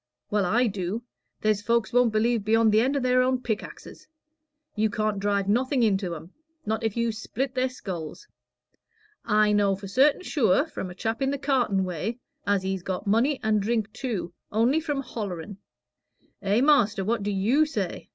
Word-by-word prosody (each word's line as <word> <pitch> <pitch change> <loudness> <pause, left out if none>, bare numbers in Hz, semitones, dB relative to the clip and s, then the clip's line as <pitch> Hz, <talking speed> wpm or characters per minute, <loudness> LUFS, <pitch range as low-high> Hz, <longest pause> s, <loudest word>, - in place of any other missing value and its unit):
"Well, 205 -2 +2
I 240 +7 +3
do. 205 +1 -3 0.4
There's 215 -2 +1
folks 235 +2 0
won't 245 -2 +4
believe 225 0 +1
beyond 225 +1 +3
the 215 +1 +4
end 270 +4 +1
o' - - +1
their 255 -1 +3
own 255 0 +1
pickaxes. 225 -4 -6 0.7
You 215 0 +1
can't 215 -1 -1
drive 200 -1 0
nothing 250 +4 +2
into 195 -5 +1
'em, 165 +4 -11 0.3
not 220 +1 -2
if 225 0 -1
you 235 0 +1
split 245 +4 -4
their 255 0 0
skulls. 190 - -7 1.0
I 210 -1 +3
know 205 -1 +3
for 195 +1 -9
certain 275 - +3
sure, 260 - +2
from 195 - -6
a 180 - -10
chap 225 +5 -3
in 270 - +2
the 280 - -1
cartin' 260 -9 +1
way, 185 +6 -3 0.3
as 200 -2 +2
he's 190 -1 -2
got 185 +1 -4
money 235 +8 +2
and 215 -1 +2
drink 220 0 -1
too, 210 -9 -4 0.2
only 235 +8 +3
for 300 -3 -2
hollering. 200 -6 -6 0.8
Eh, 205 +4 +2
master, 240 -9 +3
what 230 +1 0
do 200 - -2
you 225 +11 +2
say?" 300 - -4
220 Hz, 180 wpm, -26 LUFS, 200-250 Hz, 1.0 s, won't